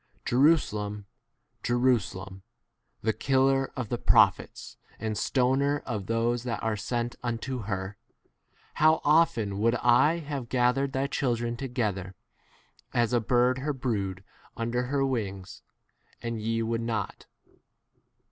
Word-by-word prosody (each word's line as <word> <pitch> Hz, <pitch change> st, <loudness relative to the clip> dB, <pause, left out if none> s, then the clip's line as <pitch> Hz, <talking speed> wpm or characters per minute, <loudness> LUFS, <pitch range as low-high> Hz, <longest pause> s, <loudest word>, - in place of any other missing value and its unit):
Jerusa 145 Hz, +2 st, +4 dB
lem, 105 Hz, 0 st, -4 dB, 0.6 s
Jerusalem, 105 Hz, -6 st, 0 dB, 0.6 s
the 110 Hz, +1 st, +2 dB
killer 135 Hz, +1 st, +2 dB
of 125 Hz, -6 st, -4 dB
the 120 Hz, -, -2 dB
prophets -, -, +2 dB, 0.2 s
and 110 Hz, 0 st, -2 dB
stoner 135 Hz, +5 st, +1 dB
of 100 Hz, -4 st, -4 dB
those 115 Hz, +1 st, 0 dB
that 120 Hz, -3 st, -4 dB
are 110 Hz, -1 st, 0 dB
sent 120 Hz, +3 st, -3 dB
unto 125 Hz, +2 st, -3 dB
her, 95 Hz, 0 st, -4 dB, 0.8 s
how 155 Hz, +1 st, +5 dB
often 120 Hz, -10 st, +3 dB
would 115 Hz, +3 st, +3 dB
I 125 Hz, +7 st, +4 dB
have 140 Hz, -7 st, -5 dB
gathered 130 Hz, +2 st, +1 dB
thy 135 Hz, +1 st, 0 dB
children 120 Hz, -4 st, -1 dB
to 135 Hz, -, -4 dB
gether, 100 Hz, -7 st, -2 dB, 0.8 s
as 120 Hz, 0 st, +2 dB
a 120 Hz, -, +4 dB
bird 125 Hz, +3 st, +2 dB
her 145 Hz, +3 st, -2 dB
brood 100 Hz, -8 st, -3 dB, 0.3 s
under 115 Hz, +1 st, -1 dB
35 125 Hz, -, -7 dB
her 140 Hz, -1 st, +2 dB
wings, 100 Hz, -8 st, -4 dB, 0.6 s
and 115 Hz, -2 st, -4 dB
ye 115 Hz, +1 st, -1 dB
would 115 Hz, 0 st, -1 dB
not. 115 Hz, -2 st, -4 dB
120 Hz, 130 wpm, -28 LUFS, 110-130 Hz, 0.8 s, how